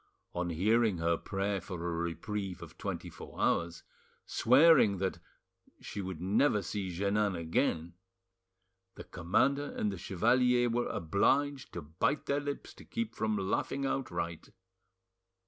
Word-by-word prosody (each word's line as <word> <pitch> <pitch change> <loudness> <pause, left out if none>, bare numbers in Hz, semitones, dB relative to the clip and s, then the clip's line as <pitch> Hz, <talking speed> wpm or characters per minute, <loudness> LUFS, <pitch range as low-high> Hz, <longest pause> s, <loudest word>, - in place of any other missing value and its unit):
On 90 0 -2
hearing 105 +4 +2
her 85 0 +2
prayer 100 +3 -2
for 90 +1 -7
a 85 0 -3
reprieve 85 +3 -3
of - - -12
twenty - - -4
four - - -11
hours, 85 0 0 0.4
swearing 130 -5 +5
that 95 0 -1
after - - -21 0.6
that - - -17
she 100 - -4
would 95 -4 -5
never 105 - +2
see 95 +1 -3
Jeannin 100 +2 0
again, 85 0 0 1.0
the - - -8
commander 130 +11 +1
and 105 - 0
the 95 - -6
chevalier 120 +6 +3
were 120 +1 0
obliged 135 - +1
to 85 - -5
bite 80 - -1
their 140 +1 +1
lips 145 0 -5
to - - -14
keep 230 -1 -4
from 110 -1 -1
laughing 105 +7 -1
outright. 85 -12 -3
100 Hz, 145 wpm, -32 LUFS, 85-120 Hz, 1.0 s, swearing